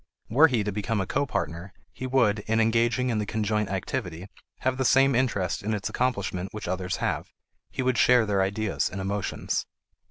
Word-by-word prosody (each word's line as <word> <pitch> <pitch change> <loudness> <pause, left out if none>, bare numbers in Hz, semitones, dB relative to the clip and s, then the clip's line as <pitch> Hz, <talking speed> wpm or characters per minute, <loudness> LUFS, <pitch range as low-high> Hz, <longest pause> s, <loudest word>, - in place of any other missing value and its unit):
Were 145 +8 +6
he 120 -7 0
to 105 - -2
become 105 +2 -1
a 95 - 0
copartner, 95 - -2 0.2
he 130 - -5
would, 120 -5 +3
in 110 +1 +2
engaging 115 +3 +2
in 110 - 0
the 105 - -1
conjoint 105 -1 0
activity, 95 -2 -3 0.4
have 130 0 0
the 135 - 0
same 135 +2 +5
interest 105 -9 0
in 105 +1 -1
its 100 - -3
accomplishment 100 -7 -1
which 110 - -5
others 90 0 -2
have. - - -2 0.4
He 130 - -3
would 125 -1 +1
share 125 -2 +5
their 100 -2 +1
ideas 100 +2 0
and 95 - -6
emotions. 100 +1 -2
110 Hz, 185 wpm, -26 LUFS, 95-125 Hz, 0.4 s, Were